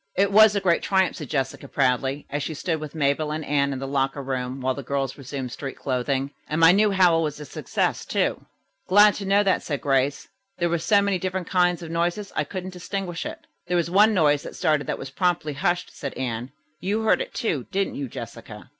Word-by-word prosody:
"It 200 +1 +3
was 215 0 +7
a - - +3
great 180 -3 +2
triumph," 190 -1 +1
said 150 -6 -7
Jessica 135 -1 -2
proudly, 135 +1 0
as 145 +1 -1
she 155 - -4
stood 160 +1 -2
with 155 0 -8
Mabel 150 +1 +1
and 155 0 -3
Anne 140 -1 +1
in 135 - -3
the 135 +1 -5
locker 135 0 -1
room 130 0 -3
while 130 0 0
the 140 - -6
girls 135 0 -2
resumed 135 -2 -6
street 135 0 -6
clothing. 135 +1 -1 0.2
"And 155 - -1
my 165 0 +8
new 210 +3 +4
howl 180 -4 +4
was 150 -2 -3
a 150 - -7
success, - - -2
too." - - -1 0.4
"Glad 205 +2 +7
to 200 - -5
know 200 +1 +4
that," 190 -2 +2
said 145 -3 -3
Grace. 135 0 +1 0.3
"There 175 -1 +1
were 170 0 0
so 200 +4 +3
many 200 -2 0
different 185 -1 -3
kinds 180 -1 +2
of 165 - -7
noises 175 +5 -1
I 155 - 0
couldn't 185 +3 -6
distinguish 180 -1 -4
it." - - -9 0.2
"There 180 0 +1
was 170 0 0
one 210 +4 +6
noise 150 -4 +3
that - - -9
started 150 -2 +1
that - - -2
was 135 - -8
promptly 170 -1 0
hushed," 175 +5 -1
said 140 - -6
Anne. 125 -1 -4 0.3
"You 205 +4 -1
heard 220 - +3
it, - - -6
too, 155 - -1
didn't 195 0 -1
you 140 - -4
Jessica?" - - -9
155 Hz, 225 wpm, -24 LUFS, 140-185 Hz, 0.4 s, my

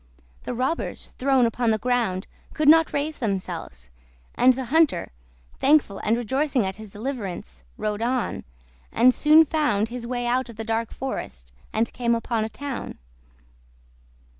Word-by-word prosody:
The - - -3
robbers, 260 +7 -3
thrown 265 -1 +3
upon 235 +1 0
the 220 - +3
ground, 230 -5 0 0.3
could 305 -2 0
not 325 +1 +6
raise 295 +2 -2
themselves, 190 - -4 0.4
and 255 +1 +5
the 260 +1 -4
hunter, 320 -2 +3 0.5
thankful 275 -8 +3
and 225 +2 +1
rejoicing 260 +1 0
at 190 +1 -4
his 215 -1 -10
deliverance, 200 - -6
rode 210 0 -2
on, 245 +1 -1 0.5
and 250 +3 +5
soon 310 +4 +6
found 285 -9 +1
his 240 -1 -6
way 245 0 -2
out 250 +1 0
of 235 - -10
the 225 - -5
dark 225 0 -2
forest, 60 - -6 0.2
and 225 +1 -1
came 235 -1 +1
upon 230 -1 -1
a 220 - -3
town. 280 +2 -6
240 Hz, 150 wpm, -24 LUFS, 215-270 Hz, 0.5 s, not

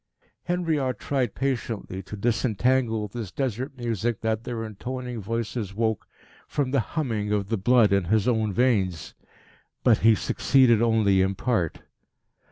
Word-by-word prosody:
Henriot 160 -9 0
tried 130 -6 -1
patiently 115 -8 -3
to 105 +2 -9
disentangle 115 +1 +1
this 105 -2 -6
desert 130 +1 -3
music 115 -2 -2
that 110 0 -1
their 115 -2 -4
intoning 125 +2 -5
voices 110 -1 -3
woke, 110 -2 -1 0.4
from 140 -4 -1
the 140 - +2
humming 110 -6 -2
of 100 -1 -1
the 115 - +1
blood 110 0 +4
in 100 -2 +2
his 105 +4 +1
own 110 -3 +1
veins. 95 -7 0 0.7
But 120 -4 +5
he 115 0 +5
succeeded 120 +1 +3
only 110 -5 +3
in 95 +1 +1
part. 100 -7 -1
115 Hz, 140 wpm, -25 LUFS, 105-125 Hz, 0.7 s, But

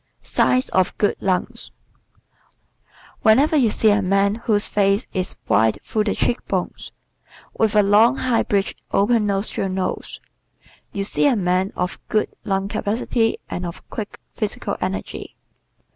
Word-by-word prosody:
Signs 255 +1 +2
of 185 0 +1
Good 205 - +1
Lungs 185 -2 -2 0.5
¶ - - -31 1.0
Whenever 265 +8 +4
you 255 -7 +4
see 215 0 +3
a 205 0 +3
man 195 +1 +2
whose 215 -2 0
face 200 +2 +1
is 185 -2 -2
wide 110 0 +3
through 215 -1 -1
the 210 - 0
cheek 240 - 0
bones - - -3 0.6
with 220 -1 +1
a 210 - +6
long, 210 +5 +5
high 250 -3 +1
bridged 200 -1 -1
open 210 +1 +2
nostrilled 195 -1 -1
nose 185 -1 -3 0.7
you 200 - -2
see 205 - +1
a 270 - +3
man 185 -1 +1
of 180 +1 -3
good 215 - 0
lung 195 0 -1
capacity 225 +2 0
and 175 - -5
of 170 0 -7
quick 215 -2 -6
physical 205 -1 -3
energy. 185 +1 -4
205 Hz, 145 wpm, -21 LUFS, 195-220 Hz, 1.0 s, a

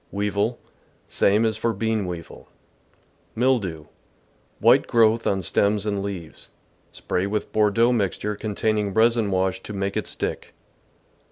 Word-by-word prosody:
Weevil. 105 +3 -1 0.3
— - - -37
Same 105 +3 +2
as 110 -1 0
for 115 0 -1
bean 110 -1 -1
weevil. 85 -2 -8 0.9
Mildew. 110 -11 0 0.4
— - - -38 0.3
White - - +5
growth 115 0 +3
on 95 -1 0
stems 100 +2 +1
and 100 -2 -1
leaves. 95 -5 -6 0.4
Spray 90 +2 -2
with 105 +1 -3
Bordeaux 110 +3 +3
mixture 105 -1 -1
containing 105 -1 -1
resin 115 -1 +3
w^ash 95 0 0
to 105 - -8
make 100 0 -2
it - - -2
stick. - - -5
105 Hz, 140 wpm, -23 LUFS, 100-110 Hz, 0.9 s, White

